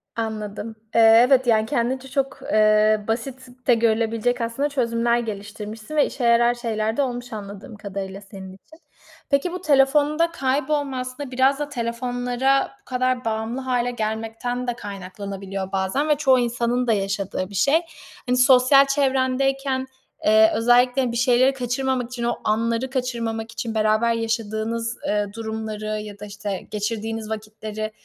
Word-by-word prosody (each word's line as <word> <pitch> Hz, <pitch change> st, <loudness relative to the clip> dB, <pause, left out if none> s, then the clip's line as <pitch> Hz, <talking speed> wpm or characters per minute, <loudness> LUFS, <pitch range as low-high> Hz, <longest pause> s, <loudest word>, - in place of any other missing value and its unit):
Anladım, 220 Hz, -1 st, -4 dB, 0.2 s
eee, 230 Hz, -, +6 dB, 0.3 s
evet, 260 Hz, -2 st, +4 dB
yani, 220 Hz, -2 st, +4 dB
kendince 260 Hz, +1 st, -1 dB
çok, 275 Hz, +1 st, -2 dB
eee, 215 Hz, 0 st, +4 dB
basit 255 Hz, +3 st, -3 dB, 0.2 s
de 245 Hz, -, +6 dB
görülebilecek 230 Hz, +1 st, +1 dB
aslında 230 Hz, +6 st, -1 dB
çözümler 235 Hz, -3 st, +1 dB
geliştirmişsin 215 Hz, +3 st, -7 dB
ve 295 Hz, -, +4 dB
işe 255 Hz, -, -5 dB
yarar 235 Hz, 0 st, +4 dB
şeyler 225 Hz, -1 st, -2 dB
de -, -, +3 dB
olmuş 245 Hz, -2 st, -3 dB
anladığım 205 Hz, +1 st, -8 dB
kadarıyla 195 Hz, -1 st, -6 dB
senin 195 Hz, -2 st, -10 dB
için. 315 Hz, +12 st, -18 dB, 0.5 s
Peki 280 Hz, +5 st, +1 dB
bu 365 Hz, 0 st, -5 dB
telefonda 295 Hz, +2 st, +3 dB
kaybolma 280 Hz, -1 st, -1 dB
aslında 255 Hz, +2 st, -6 dB
biraz 265 Hz, +2 st, +2 dB
da 295 Hz, -, -3 dB
telefonlara 245 Hz, +1 st, 0 dB
bu -, -, -46 dB
kadar 255 Hz, -1 st, -1 dB
bağımlı 225 Hz, +3 st, -2 dB
hâle 245 Hz, -1 st, 0 dB
gelmekten 225 Hz, +2 st, -3 dB
de 245 Hz, -, 0 dB
kaynaklanabiliyor 195 Hz, -2 st, -6 dB
bazen 195 Hz, +11 st, 0 dB
ve 300 Hz, -, +5 dB
çoğu 270 Hz, -3 st, +4 dB
insanın 240 Hz, +1 st, 0 dB
da 225 Hz, -, +4 dB
yaşadığı 195 Hz, -1 st, -2 dB
bir 200 Hz, -, -10 dB
şey. 280 Hz, -, +3 dB, 0.5 s
Hani, 250 Hz, 0 st, +2 dB
sosyal 260 Hz, +2 st, +6 dB
çevrendeyken, 270 Hz, -1 st, 0 dB, 0.4 s
eee, 220 Hz, +1 st, +6 dB
özellikle 245 Hz, +2 st, +3 dB
bir 235 Hz, -, -3 dB
şeyleri 250 Hz, +2 st, +4 dB
kaçırmamak 255 Hz, 0 st, -1 dB
için, 240 Hz, -2 st, -5 dB
o 240 Hz, 0 st, 0 dB
anları 230 Hz, +4 st, 0 dB
kaçırmamak 230 Hz, -4 st, -3 dB
için 230 Hz, -1 st, -5 dB
beraber 215 Hz, +2 st, +2 dB
yaşadığınız, 225 Hz, +1 st, -2 dB
eee, 210 Hz, 0 st, +1 dB
durumları 220 Hz, -1 st, -5 dB
ya 210 Hz, -1 st, -9 dB
da 210 Hz, -, -7 dB
işte 205 Hz, -1 st, -5 dB
geçirdiğiniz 220 Hz, +1 st, -3 dB
vakitleri 215 Hz, 0 st, -5 dB
235 Hz, 145 wpm, -23 LUFS, 215-260 Hz, 0.5 s, eee